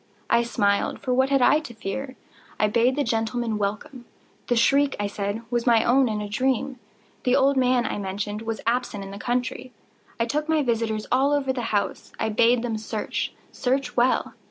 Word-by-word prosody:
I 235 - +5
smiled,—for 210 +2 0
what 260 +1 +3
had 275 -2 +3
I 300 - +5
to 240 -7 -10
fear? 260 +5 -5 0.4
I 210 - +4
bade 235 +4 +2
the 290 - +1
gentlemen 225 -1 -1
welcome. 240 +6 -4 0.4
The 245 - +2
shriek, 275 +4 +3
I 205 - 0
said, 200 +2 -3
was 240 0 -1
my 230 -2 +5
own 255 +1 +3
in 210 -1 -2
a 210 - -4
dream. 260 +4 -1 0.4
The 250 -1 +3
old 275 +1 +4
man, 250 -1 +2
I - - -2
mentioned, 205 +2 -4
was 225 0 -4
absent 230 -3 -1
in 195 - -8
the 200 - -8
country. 250 +2 -2 0.5
I 230 - +2
took 300 +6 -2
my 315 -2 +3
visitors 225 -3 -1
all 270 +3 +3
over 270 -2 +1
the 255 - -3
house. 205 -1 -2
I - - 0
bade 235 +2 +3
them 225 -3 -2
search—search 245 +4 -3
well. 245 +1 +2
240 Hz, 185 wpm, -24 LUFS, 215-260 Hz, 0.5 s, I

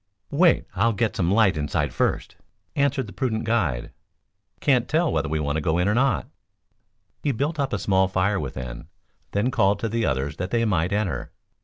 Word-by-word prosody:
"Wait, 165 +4 +4
I'll 115 +4 +2
get 110 +2 0
some 90 -2 +1
light 100 -2 +4
inside 75 -1 -1
first," - - -1 0.4
answered 140 -2 +1
the 105 - -11
prudent 115 -4 -1
guide. 90 - 0 0.7
"Can't 125 -4 +2
tell 165 +2 +2
whether 80 - 0
we 80 - 0
shall 75 - -2
want 70 +1 0
to - - -1
go 80 +2 +1
in 90 +2 +2
or 105 - +3
not." 130 0 +2 1.0
He 145 - +1
built 145 +6 -2
up 135 -1 0
a 105 - 0
small 95 -1 +2
fire 95 +1 +1
within, 65 -4 -6 0.4
then 105 +6 0
called 100 -3 +3
to 115 - -1
the 115 +1 0
others 70 +3 -1
that 90 +1 -3
they 115 +2 +1
might 90 -5 +1
enter. 95 - -2
100 Hz, 195 wpm, -24 LUFS, 80-120 Hz, 1.0 s, Wait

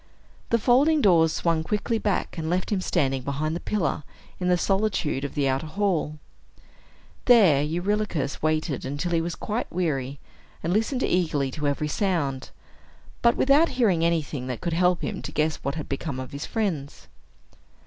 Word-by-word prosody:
The 230 - +3
folding 270 +7 +4
doors 170 - +4
swung 165 -1 0
quickly 210 +6 -1
back, 205 -4 -1
and 160 -2 -3
left 180 +4 -1
him 195 -3 +1
standing 135 -8 0
behind 145 +4 -2
the - - -3
pillar, 175 -5 -1 0.4
in 180 - -1
the 180 0 +4
solitude 195 -8 0
of 140 - -5
the 145 -2 +1
outer 135 +4 -1
hall. 165 -3 -1 1.1
There 200 - +6
Eurylochus 175 -1 -1
waited 155 -3 0
until 145 +6 -3
he 165 -1 +2
was 170 0 -3
quite 220 +7 -3
weary, 140 -6 -2 0.4
and 170 - 0
listened 225 +5 0
eagerly 150 -7 +1
to 150 +2 -2
every 145 +2 -1
sound, 150 -7 -1 0.7
but 235 0 +4
without 285 +5 +4
hearing 190 -10 +3
anything 155 -6 -1
that 125 -3 -4
could 170 -2 -2
help 180 +1 +2
him - - -3
to - - -6
guess 155 0 0
what 140 +2 -4
had 155 - -5
become 140 -1 -4
of 130 +2 -7
his 140 +1 -5
friends. 175 -11 -3
165 Hz, 170 wpm, -25 LUFS, 145-200 Hz, 1.1 s, There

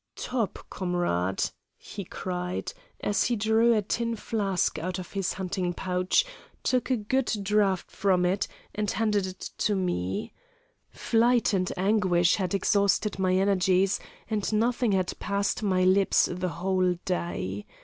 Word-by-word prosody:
"'Topp, 235 -7 -2
comrade!' 175 - -1 0.3
he 200 - -8
cried, 180 - -4 0.3
as 205 - +1
he 240 - +1
drew 220 +2 +3
a 210 - +1
tin 230 +3 -1
flask 200 -7 -1
out 185 +3 -3
of 180 -1 -8
his 195 -3 -1
hunting 180 -1 -2
pouch, 185 - +1 0.4
took 255 0 +1
a 255 - +2
good 245 +5 0
draught 195 -2 +1
from 190 -2 +2
it, 190 +3 +1 0.3
and 210 -1 -1
handed 210 -3 +1
it 185 0 -7
to 210 - +2
me. 95 - -2 0.6
Flight 235 0 +2
and 185 -1 +1
anguish 185 -3 +3
had 190 -1 -1
exhausted 200 +1 +1
my 185 -1 +2
energies, 190 0 +2 0.3
and 215 -2 -1
nothing 230 +1 +1
had 185 -1 0
passed 200 +1 -1
my 185 -3 +2
lips 190 +1 +4
the 180 +1 -2
whole 185 +1 +1
day. 105 - -3
190 Hz, 140 wpm, -27 LUFS, 180-210 Hz, 0.6 s, lips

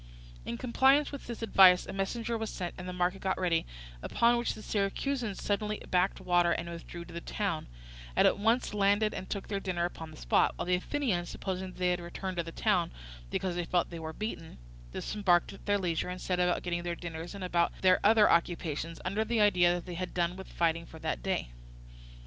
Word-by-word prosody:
In 115 - -4
compliance 270 +4 +3
with 280 - -8
this 235 -1 -6
advice 190 -4 +7
a - - -7
messenger 225 +4 -2
was 220 -1 -3
sent 175 -2 -4
and 180 0 -7
the - - -3
market 180 +1 -1
got 190 -1 -1
ready, 170 -3 +1 0.3
upon 235 +1 +3
which 240 0 -1
the 215 - -10
Syracusans 215 +2 -1
suddenly 210 +1 -1
backed 180 +1 +2
water 175 -2 +3
and 170 - -1
withdrew 170 0 -8
to 170 - -12
the 170 - -5
town, 195 -6 -2 0.5
and - - +6
at - - +1
once 225 +2 +2
landed 205 +1 +2
and 185 - -6
took 200 - -4
their 200 -2 -2
dinner 180 -3 -1
upon 165 -2 -6
the 155 - -12
spot; - - +2
while - - -4
the 180 - +1
Athenians, 185 -2 0
supposing 190 -1 -4
that 185 - -11
they 180 -1 +2
had 180 - 0
returned 180 +2 -5
to 170 - +1
the 165 - -7
town 185 -3 +1 0.4
because 185 - -1
they 175 - -1
felt 175 0 0
they 170 - -6
were 160 0 -5
beaten, 170 - -6 0.3
disembarked 180 - +1
at 195 - -14
their 205 0 +3
leisure 175 -3 -1
and 180 0 -5
set 180 -1 -1
about 180 0 +1
getting 175 -1 -1
their 175 0 -3
dinners 170 +2 -7
and 200 - -6
about 170 -1 +2
their 185 -1 +6
other 215 0 +6
occupations, 165 -1 0
under 200 +4 0
the 230 +1 0
idea 180 -4 +5
that 175 - -5
they 180 0 -4
done 175 0 -1
with 190 0 -9
fighting 165 0 0
for 160 - -11
that 65 - -3
day. - - -2
180 Hz, 215 wpm, -30 LUFS, 175-205 Hz, 0.5 s, advice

